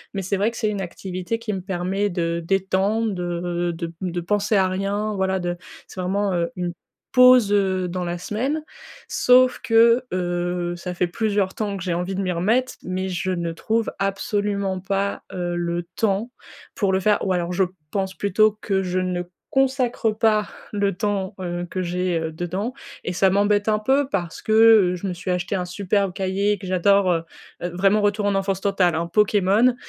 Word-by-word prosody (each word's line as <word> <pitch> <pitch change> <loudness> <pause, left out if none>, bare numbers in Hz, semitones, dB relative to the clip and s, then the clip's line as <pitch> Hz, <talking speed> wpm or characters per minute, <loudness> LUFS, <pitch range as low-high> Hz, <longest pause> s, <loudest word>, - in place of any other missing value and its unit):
mais 195 - -2
c'est 195 +2 -1
vrai 205 +3 +2
que 235 - -10
c'est 215 - 0
une 205 -2 -3
activité 185 +3 -4
qui 230 -2 -4
me 190 - -3
permet 190 +2 -1
de 170 -2 -1
détendre, 195 +4 +1
de 175 -1 -2
de 165 -1 -5
de 175 -1 -2
penser 205 +4 0
à 190 -2 +4
rien, 200 +3 -1
voilà 190 0 0
de 175 -1 -2 0.3
c'est 185 - -7
vraiment, 195 +2 0
heu, 170 -1 0
une 180 -1 -3 0.4
pause, 250 -4 +7
heu, 190 -3 +1
dans 180 0 -3
la 175 0 -3
semaine 260 - -2 0.5
sauf 250 0 +4
que, 230 +2 +5
heu, 175 -1 -1
ça 180 +1 -5
fait 180 0 0
plusieurs 200 0 0
temps 205 -2 -3
que 190 - -6
j'ai 180 -2 -1
envie 180 +3 -2
de 195 - -1
m'y 185 -2 -1
remettre 220 +9 +1
mais 185 +1 -3
je 185 +1 -2
ne 170 -2 -2
trouve 225 +7 -1
absolument 195 -1 -1
pas, 195 +1 -2
heu, 175 -1 -2
le 175 0 -2
temps 220 +2 0 0.4
pour 195 -3 0
le 190 - +2
faire 210 +2 +3
ou 190 - +2
alors 175 -1 -1
je 185 +2 +2 0.3
pense 190 -1 -2
plutôt 210 +2 +2
que 195 -2 0
je 185 0 -1
ne 180 -1 -1 0.3
consacre 260 -4 +1
pas 215 -1 +2 0.2
le 200 -2 0
temps, 195 -2 -2
heu, 175 -1 -3
que 185 - -3
j'ai, 180 0 -1
heu, 160 -1 -3
dedans 180 +8 -3 0.3
et - - -2
ça 190 +2 +3
m'embête 205 +2 +2
un 215 -1 +2
peu 265 +6 +2
parce 175 -10 -3
que, 215 - -1
heu, 220 -5 +6
je 180 - -7
me 185 - -2
suis 180 +2 -7
achetée 180 +2 -1
un 180 -2 -1
superbe 195 +1 0
cahier 195 +2 0
et - - -3
que 195 - -10
j'adore, 185 +1 +3
heu 165 -1 0 0.4
heu, 175 - -2
vraiment 195 +3 +3
retour 205 +1 +1
en 200 - +1
enfance 195 -1 -1
totale, 190 -4 +2
hein, 165 +1 -1
Pokémon, 210 +5 +3
190 Hz, 195 wpm, -23 LUFS, 180-210 Hz, 0.5 s, pause